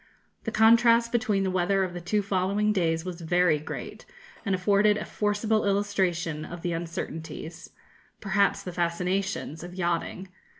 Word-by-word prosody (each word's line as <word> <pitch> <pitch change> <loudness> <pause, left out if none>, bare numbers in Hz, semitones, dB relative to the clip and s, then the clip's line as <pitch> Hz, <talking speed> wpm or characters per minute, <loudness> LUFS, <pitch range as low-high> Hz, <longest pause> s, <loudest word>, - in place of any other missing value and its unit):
The 225 - -2
contrast 230 +1 +5
between 220 -5 +1
the 190 - 0
weather 185 +2 +2
of 185 -2 -3
the 175 - -6
two 205 +4 0
following 200 +2 +1
days 165 -3 0
was 180 -2 -6
very 175 -1 +2
great, 155 - -7 0.4
and 195 -3 +1
afforded 205 +3 +3
a 210 - -4
forcible 210 +1 0
illustration 190 -6 0
of 175 +1 -8
the 175 -1 -1
uncertainties, 165 -1 -6 0.5
perhaps 200 0 +1
the 180 - -5
fascinations, 180 -1 -2
of 175 +1 -9
yachting. 175 +1 -2
185 Hz, 145 wpm, -27 LUFS, 175-205 Hz, 0.5 s, contrast